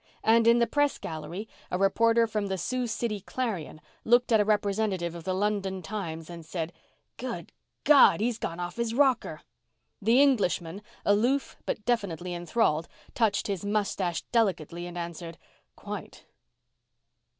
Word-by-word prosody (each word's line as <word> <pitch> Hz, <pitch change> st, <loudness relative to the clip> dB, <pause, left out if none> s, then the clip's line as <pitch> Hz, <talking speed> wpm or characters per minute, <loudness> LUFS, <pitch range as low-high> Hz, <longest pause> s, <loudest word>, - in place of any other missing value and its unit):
And 230 Hz, +1 st, +4 dB
in 235 Hz, +1 st, +7 dB
the 235 Hz, -, +4 dB
press 290 Hz, +3 st, +1 dB
gallery 165 Hz, +6 st, -6 dB, 0.2 s
a 180 Hz, -, -1 dB
reporter 230 Hz, +4 st, +3 dB
from 215 Hz, -2 st, -2 dB
the 190 Hz, -1 st, -2 dB
Sioux 250 Hz, +7 st, -2 dB
City 220 Hz, -1 st, -2 dB
Clarion 200 Hz, -7 st, -4 dB, 0.2 s
looked 240 Hz, +1 st, +3 dB
at 220 Hz, -, +6 dB
a -, -, +5 dB
representative 200 Hz, -4 st, 0 dB
of 170 Hz, -1 st, -9 dB
the 185 Hz, -, 0 dB
London 195 Hz, -2 st, -1 dB
Times, 165 Hz, -4 st, -5 dB
and 170 Hz, -1 st, -9 dB
said, 160 Hz, 0 st, -4 dB, 0.4 s
"Good -, -, -5 dB, 0.3 s
God! 290 Hz, -7 st, +7 dB
He's 230 Hz, +1 st, -1 dB
gone 165 Hz, +1 st, -4 dB
off 175 Hz, +2 st, -5 dB
his 235 Hz, -1 st, -1 dB
rocker!" 265 Hz, -3 st, +2 dB, 0.6 s
The 230 Hz, +5 st, +4 dB
Englishman, 200 Hz, -9 st, +2 dB, 0.2 s
aloof 240 Hz, +7 st, +2 dB
but 210 Hz, -, -3 dB
definitely 180 Hz, -7 st, -1 dB
enthralled, 175 Hz, -2 st, 0 dB, 0.3 s
touched 220 Hz, -4 st, +1 dB
his 200 Hz, -3 st, -3 dB
mustache 200 Hz, -5 st, -1 dB
delicately 175 Hz, -7 st, 0 dB
and 175 Hz, 0 st, -8 dB
answered, 170 Hz, -1 st, -6 dB, 0.4 s
"Quite." -, -, -8 dB
205 Hz, 145 wpm, -28 LUFS, 175-230 Hz, 0.6 s, in